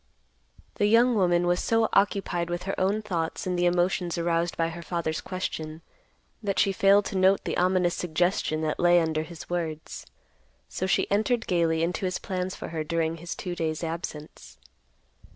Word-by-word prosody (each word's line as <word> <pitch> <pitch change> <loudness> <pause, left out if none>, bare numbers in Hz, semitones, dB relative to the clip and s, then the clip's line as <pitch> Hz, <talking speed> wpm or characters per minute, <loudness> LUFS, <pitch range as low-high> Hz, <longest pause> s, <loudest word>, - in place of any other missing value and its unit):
The 205 - +3
young 235 +3 +5
woman 175 -4 +2
was 175 0 +2
so 225 -1 +2
occupied 195 -4 +1
with 175 0 -3
her 195 - -3
own 200 +3 +1
thoughts 170 -6 -3
and 180 -1 -1
the 175 0 +2
emotions 175 0 +1
aroused 170 0 0
by 165 0 +1
her 170 +1 -7
father's 170 -2 -2
question, 160 -4 -5 0.6
that 200 -3 -2
she 195 - +3
failed 195 +1 +4
to 195 - -3
note 190 +1 +4
the - - -2
ominous 180 -1 +2
suggestion 175 -2 0
that 155 -1 -2
lay 175 0 +5
under 160 -2 0
his 160 +1 -9
words. 160 -3 -4 0.6
So 185 - -3
she - - +2
entered 220 +3 +1
gaily 165 -2 +1
into 175 +2 -1
his 185 0 -1
plans 185 -1 -3
for - - -7
her 160 -1 -3
during 165 +1 -1
his 170 +1 -6
two 180 - -5
days' 160 -1 -2
absence. 150 - -6
175 Hz, 175 wpm, -27 LUFS, 165-190 Hz, 0.6 s, young